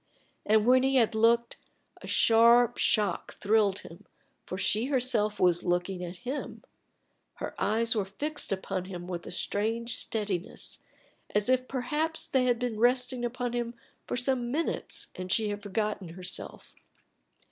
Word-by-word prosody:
And 215 0 +4
when 255 +1 +6
he 270 +1 +1
had 230 -4 +4
looked, 230 +2 +2 0.4
a - - -9
sharp 235 +1 +5
shock 205 -5 0
thrilled 205 -1 +2
him, 165 - -13 0.4
for 185 - -4
she 215 +3 +1
herself 240 -6 +1
was 175 -1 +3
looking 180 +1 -1
at 175 +1 -6
him; 270 +4 -5 0.7
her - - -5
eyes 230 +2 +2
were 205 -3 0
fixed 295 +9 -3
upon 190 -1 -2
him 180 -2 -7
with 175 -2 -5
a - - -7
strange 225 +5 -2
steadiness, 205 -5 -3 0.6
as 210 +3 +2
if 255 0 +2
perhaps 300 +5 0
they 260 -2 +2
had 245 -1 +2
been 235 -3 -3
resting 250 +1 +2
upon 245 0 -2
him 240 -1 -3 0.3
for - - -2
some 245 -1 0
minutes 315 +6 -1
and 185 0 -6
she 215 +1 +1
had 205 0 -4
forgotten 205 -2 -2
herself. 180 +2 -4
225 Hz, 150 wpm, -29 LUFS, 195-245 Hz, 0.7 s, when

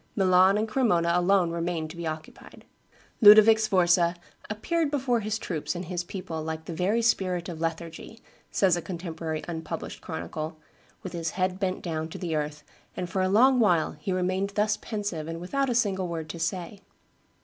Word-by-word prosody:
Milan 190 0 +5
and 215 +1 0
Cremona 210 -9 +2
alone 180 -1 +3
remained 170 -2 -2
to - - -11
be 170 -1 -4
occupied. 155 0 -8 0.6
Ludovic 215 +1 +9
Sforza 180 -5 +3 0.3
"appeared 310 +10 -1
before 265 -4 +1
his 215 0 -2
troops 170 -5 -4
and 175 +1 -4
his 175 0 -3
people 175 -3 -6
like 160 0 -5
the 170 - -5
very 200 +8 +1
spirit 185 -6 +1
of 165 -3 -7
lethargy," 165 +6 -5 0.3
says 190 -3 +3
a 175 - -3
contemporary 165 -3 -5
unpublished 165 -2 -6
chronicle, 155 - -5 0.5
"with 185 - -6
his 165 -1 -2
head 185 +1 -1
bent 190 -2 -2
down 160 -2 -3
to - - -7
the 170 -3 -3
earth, 150 0 -3 0.3
and 180 -1 -4
for 190 - 0
a 185 - +1
long 250 +6 +5
while 175 -8 +3
he 150 +6 -5
remained 185 +2 0
thus 210 0 +2
pensive 205 -10 -4
and 165 0 -5
without 270 +10 -1
a 245 - 0
single 195 -6 +1
word 165 -2 -5
to 170 - -8
say. 175 +4 -3
180 Hz, 180 wpm, -27 LUFS, 165-205 Hz, 0.6 s, Ludovic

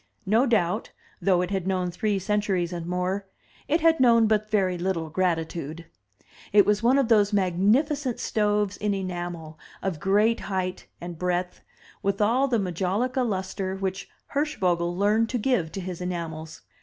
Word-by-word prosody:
No 225 +7 +3
doubt, 180 -7 +1 0.3
though 180 -2 +3
it 180 - -4
had 190 -2 -2
known 185 -2 0
three 205 +3 0
centuries 195 -3 0
and 170 -1 -5
more, 180 +2 -2 0.4
it 315 +3 +1
had 325 -1 +4
known 230 -3 +5
but 215 -1 +1
very 190 -4 +1
little 170 -3 -2
gratitude. 165 -2 -2 0.7
It 205 -1 +6
was 210 0 +2
one 245 +4 +4
of 275 -4 +2
those 210 -3 +4
magnificent 225 - +1
stoves 210 -2 0
in 205 -1 -1
enamel, 175 -4 -5 0.2
of 185 -5 -2
great 210 +6 +2
height 185 -2 -3
and 175 -2 -7
breadth, 180 0 -2 0.4
with 200 0 -1
all 240 +6 +3
the 245 -3 +1
majolica 200 - -1
lustre 190 -3 -2
which 190 0 -4 0.2
Hirschvogel 180 - 0
learned 215 +3 +2
to 250 - -1
give 210 -9 0
to - - -4
his 180 -1 -6
enamels. 160 -3 -5
195 Hz, 155 wpm, -26 LUFS, 180-215 Hz, 0.7 s, It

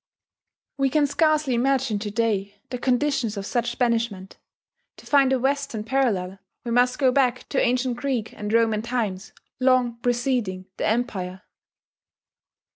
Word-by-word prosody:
We 270 0 +3
can 295 +2 +3
scarcely 305 -2 +2
imagine 255 -2 +1
to 210 0 -4
day 205 -2 -1 0.2
the 250 - -3
conditions 250 -4 0
of 195 - -4
such 240 +2 -2
banishment: 230 -6 -1 0.6
to - - -15
find 275 -2 +4
a 265 - +3
Western 270 -3 -1
parallel 215 -7 0 0.3
we 235 - -3
must 245 +1 +3
go 265 -3 +3
back 250 -2 +1
to 275 - +1
ancient 245 0 +1
Greek 245 -4 -2
and 210 0 -5
Roman 225 -2 +2
times 220 -5 -3 0.3
long 255 -2 +2
preceding 240 -6 -1
the - - -1
Empire. 190 -5 -2
240 Hz, 140 wpm, -24 LUFS, 215-265 Hz, 0.6 s, find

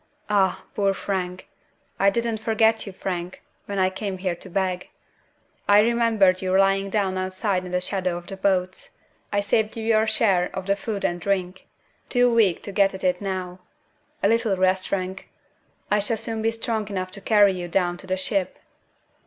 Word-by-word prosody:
"Ah! 195 -2 +2
poor 200 -1 +1
Frank. 185 -2 -3 0.5
I 200 - +5
didn't 230 +1 -1
forget 220 0 +2
you, - - -5
Frank, 180 -1 -5 0.2
when 200 - -4
I 185 0 +2
came 190 0 -4
here 185 -1 -1
to 180 +2 -10
beg. 185 0 -2 0.8
I 205 0 +7
remembered 225 -5 +3
you 185 0 +1
lying 195 0 +3
down 190 -2 0
outside 185 0 -1
in 180 - -7
the 180 - +1
shadow 180 -1 -2
of 175 - -9
the 195 - -7
boats. 185 -1 -1 0.3
I 205 - +1
saved 215 +2 0
you 225 - -4
your 220 0 +3
share 190 -6 +2
of 190 - -4
the 200 0 +2
food 205 0 -4
and 175 0 -1
drink. 185 -1 -2 0.4
Too 245 -1 +3
weak 210 -7 +3
to 200 - -4
get 195 -1 +2
at 190 - -9
it 180 0 +1
now! 185 -2 -4 0.6
A - - +5
little 225 -3 +2
rest, 185 0 +2
Frank! 190 0 -3 0.6
I 210 - +4
shall 215 +3 -1
soon 225 0 -4
be 225 - +2
strong 225 -2 -2
enough 185 -2 -4
to 200 +1 -9
carry 205 -1 +5
you 180 -1 -5
down 175 0 0
to 190 - -11
the 185 0 0
ship." 190 0 -1
195 Hz, 185 wpm, -24 LUFS, 185-210 Hz, 0.8 s, I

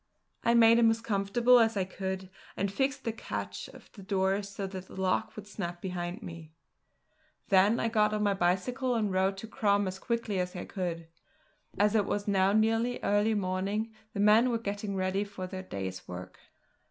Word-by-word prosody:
I 235 +1 +3
made 230 0 +7
him 230 -1 +6
as 225 0 +1
comfortable 230 +3 +3
as 225 -2 +3
I 195 - +2
could, 190 0 -5 0.3
and 200 0 0
fixed 270 +5 -1
the 230 - -1
catch 225 - -5
of - - -15
the 205 - -12
door 195 0 +1
so 200 0 -6
that 190 -1 -7
the - - -10
lock 185 -1 0
would 215 - -8
snap 175 -4 -5
behind 180 +3 -4
me. 165 -2 -9 1.0
Then 195 +4 +5
I - - +1
got 215 -2 +2
on 210 0 0
my 205 -1 +3
bicycle 220 +8 0
and 215 -3 0
rode 190 +1 +1
to 225 - -7
Crom 205 -2 +1
as 185 +1 -5
quickly 230 -5 -2
as 180 0 -2
I 180 - -5
could. 170 -3 -4 0.7
As 205 +2 +3
it 210 -3 +2
was 205 0 -2
now 195 -1 +3
nearly 225 +3 +2
early 205 +2 +2
morning 200 +3 -1 0.2
the - - -4
men 215 +4 +5
were 235 - +1
getting 205 -2 -4
ready 190 +1 0
for 200 -2 -7
their 185 0 -6
day's 95 - -6
work. 90 0 -8
200 Hz, 190 wpm, -30 LUFS, 185-225 Hz, 1.0 s, made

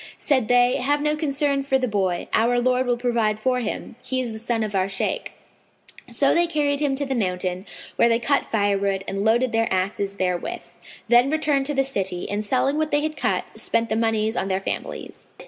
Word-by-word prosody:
Said 260 -7 +1
they, 245 0 +4
"Have 290 +3 +1
no 300 0 +2
concern 285 -2 0
for 270 -1 +1
the 255 -1 -1
boy, 190 -5 -1
our 235 +2 +3
Lord 255 +1 +1
will 245 -1 +1
provide 235 -3 0
for 250 +2 +1
him: 230 0 -5
he 260 - -1
is 245 -3 -2
the 220 - -7
son 230 0 -1
of 210 -1 -4
our 190 0 +1
Shaykh." 195 - -2 0.7
So - - +2
they 345 0 +3
carried 290 -3 0
him 285 -2 +1
to 285 +1 -1
the 270 - -2
mountain, 185 -3 -2 0.3
where 235 - +5
they 230 - +3
cut 275 +5 0
firewood 200 -2 +1
and 195 0 -2
loaded 235 +3 +2
their 225 0 +1
asses 195 +1 -1
therewith; 185 - -3 0.4
then 240 +3 +5
returned 295 -3 +1
to 295 - -2
the 270 - +3
city 190 -9 -3
and, 205 +1 -1
selling 270 +6 +1
what 310 -1 0
they 290 0 +2
had 310 0 -2
cut, - - 0
spent 230 0 0
the - - +2
monies 220 0 0
on - - -1
their 190 -1 0
families. - - -6
240 Hz, 210 wpm, -23 LUFS, 205-275 Hz, 0.7 s, where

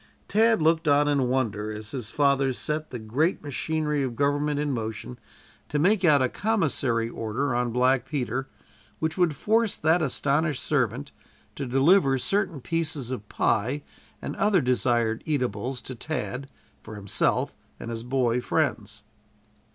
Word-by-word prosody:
Tad 220 -3 +3
looked 160 0 +2
on 145 0 +4
in 140 -4 +2
wonder 110 -5 -1
as 105 0 -7
his 125 -6 -5
father 140 -2 +2
set 155 +4 -3
the 125 - -5
great 130 - 0
machinery 150 +2 -1
of 130 -3 -2
government 145 +2 +1
in 150 -1 0
motion 115 0 -5 0.5
to 150 - -1
make 190 +7 +3
out 145 -6 +5
a - - +3
commissary 140 - 0
order 115 +4 -2
on 120 0 0
black 125 +2 +2
Peter, 135 -2 -2 0.5
which 160 0 -2
would 175 -5 +2
force 220 +7 +1
that 160 +3 +3
astonished 145 +1 0
servant 135 -1 -1 0.4
to 140 - -4
deliver 135 +2 +4
certain 185 +1 -1
pieces 155 -5 -2
of 105 -5 -6
pie 130 +8 0 0.4
and - - -4
other 200 -2 +3
desired 120 -4 +1
eatables 125 -3 -2
to 130 - -6
Tad, 135 0 -4 0.3
for 110 - -10
himself 100 -1 0 0.3
and 115 - -6
his 115 -1 -4
boy 125 -1 0
friends. 110 -9 -1
135 Hz, 150 wpm, -26 LUFS, 120-155 Hz, 0.5 s, out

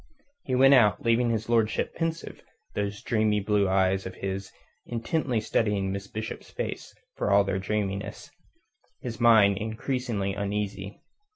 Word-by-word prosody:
He 130 - 0
went 135 +2 +6
out, 105 -6 +4
leaving 115 +1 +3
his 110 -2 -1
lordship 115 -2 +1
pensive, 165 0 -4 0.3
those 100 0 -3
dreamy 110 -2 +1
blue 100 -1 +1
eyes 95 0 +2
of 95 - -9
his 95 0 -4 0.4
intently 120 +1 -1
studying 105 -3 0
Miss 100 0 -5
Bishop's 110 +2 -6
face - - -5 0.2
for - - -1
all 100 0 +5
their 95 -1 -1
dreaminess; 100 0 -3 0.7
his 120 -2 -6
mind 105 -4 +6
increasingly 110 -2 -2
uneasy. 100 0 -4
105 Hz, 135 wpm, -27 LUFS, 100-115 Hz, 0.7 s, went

